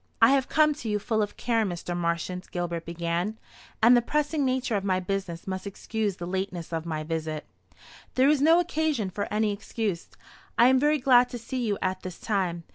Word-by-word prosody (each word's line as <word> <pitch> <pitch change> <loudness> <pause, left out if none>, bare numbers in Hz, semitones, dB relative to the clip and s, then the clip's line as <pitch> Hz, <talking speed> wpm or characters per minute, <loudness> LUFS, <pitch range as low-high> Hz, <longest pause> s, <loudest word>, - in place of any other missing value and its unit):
"I 230 +1 +7
have 275 -1 +2
come 305 +1 +4
to 225 - -4
you 210 - +1
full 215 +1 0
of 205 - -3
care, 230 -2 +1
Mr. 175 -2 -3
Marchant," 175 +2 -2
Gilbert 170 -2 -3
began; 170 +5 -2 0.5
"and 240 +2 +8
the 240 - +5
pressing 300 +3 0
nature 255 -3 0
of 200 - -1
my 185 -2 +1
business 185 -2 -4
must 190 +1 -4
excuse 210 0 -3
the 175 - -6
lateness 180 -2 -4
of 165 0 -3
my 155 -2 -2
visit." 155 -1 -3 0.7
"There 260 +1 +5
is 295 -1 +3
no 325 +3 +6
occasion 310 - 0
for 200 +3 -4
any 210 0 +1
excuse. 205 -3 -3 0.5
I 240 +2 +7
am 260 0 +4
very 300 +2 +3
glad 250 -2 +5
to 245 - -5
see 245 +2 -4
you 210 -3 0
at 185 0 -1
this 185 -2 -7
time. 185 -5 -1
205 Hz, 200 wpm, -27 LUFS, 175-250 Hz, 0.7 s, and